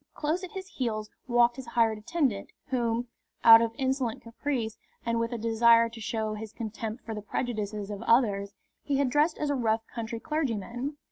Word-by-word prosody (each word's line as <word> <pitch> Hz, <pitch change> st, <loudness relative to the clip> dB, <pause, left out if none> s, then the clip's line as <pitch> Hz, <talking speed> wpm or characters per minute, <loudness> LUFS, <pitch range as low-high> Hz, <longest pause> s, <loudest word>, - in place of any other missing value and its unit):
Close 320 Hz, +5 st, -1 dB
at 370 Hz, -, -7 dB
his 380 Hz, -1 st, -6 dB
heels 220 Hz, -, -3 dB, 0.2 s
walked 240 Hz, 0 st, +4 dB
his 265 Hz, -2 st, -8 dB
hired 230 Hz, -2 st, +2 dB
attendant, 235 Hz, -3 st, -1 dB, 0.2 s
whom, 240 Hz, -2 st, 0 dB, 0.4 s
out 225 Hz, 0 st, +10 dB
of 230 Hz, -1 st, +1 dB
insolent 260 Hz, -3 st, -1 dB
caprice 230 Hz, -1 st, -3 dB, 0.3 s
and 230 Hz, 0 st, +1 dB
with 230 Hz, +1 st, -1 dB
a 240 Hz, -, -2 dB
desire 230 Hz, +1 st, +5 dB
to 230 Hz, 0 st, -10 dB
show 220 Hz, 0 st, -2 dB
his 215 Hz, 0 st, -7 dB
contempt 225 Hz, +1 st, -6 dB
for 225 Hz, -, -4 dB
the 210 Hz, -, -5 dB
prejudices 210 Hz, -2 st, -3 dB
of 205 Hz, -, -5 dB
others, 205 Hz, -4 st, +2 dB, 0.3 s
he 280 Hz, -2 st, 0 dB
had 275 Hz, -2 st, +1 dB
dressed 300 Hz, +3 st, +3 dB
as 295 Hz, -1 st, -1 dB
a -, -, +1 dB
rough 225 Hz, -3 st, 0 dB
country 230 Hz, 0 st, -5 dB
clergyman. 265 Hz, -1 st, -2 dB
230 Hz, 185 wpm, -28 LUFS, 220-260 Hz, 0.4 s, out